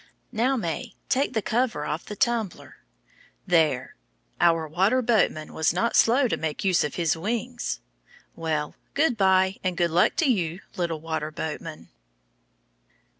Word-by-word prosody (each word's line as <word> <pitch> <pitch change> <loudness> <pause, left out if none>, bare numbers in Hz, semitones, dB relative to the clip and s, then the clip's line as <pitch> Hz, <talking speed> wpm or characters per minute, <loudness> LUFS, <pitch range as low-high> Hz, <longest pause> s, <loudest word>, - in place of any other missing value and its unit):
Now, 255 +4 +1
May, 215 +4 -4
take 275 +2 +1
the 220 - 0
cover 225 -10 0
off 155 +3 -3
the 210 - -7
tumbler. 230 -5 -1 0.7
There! 160 -3 +2 0.5
Our 165 -2 +3
water 190 +11 +2
boatman 200 -9 +1
was 160 0 +1
not 230 +7 0
slow 255 +3 +5
to - - -1
make 160 -2 -3
use 185 -3 +3
of 150 - -3
his 165 -3 +1
wings. 235 +7 -3 0.5
Well, 155 -2 -2 0.2
good 290 -3 +3
by 190 -1 +3
and 185 -2 -1
good 170 -2 +2
luck 175 +3 +3
to 335 - +2
you, 185 - 0
little 170 -5 -2
water 160 -1 -3
boatman. 155 0 -6
185 Hz, 145 wpm, -25 LUFS, 160-230 Hz, 0.7 s, slow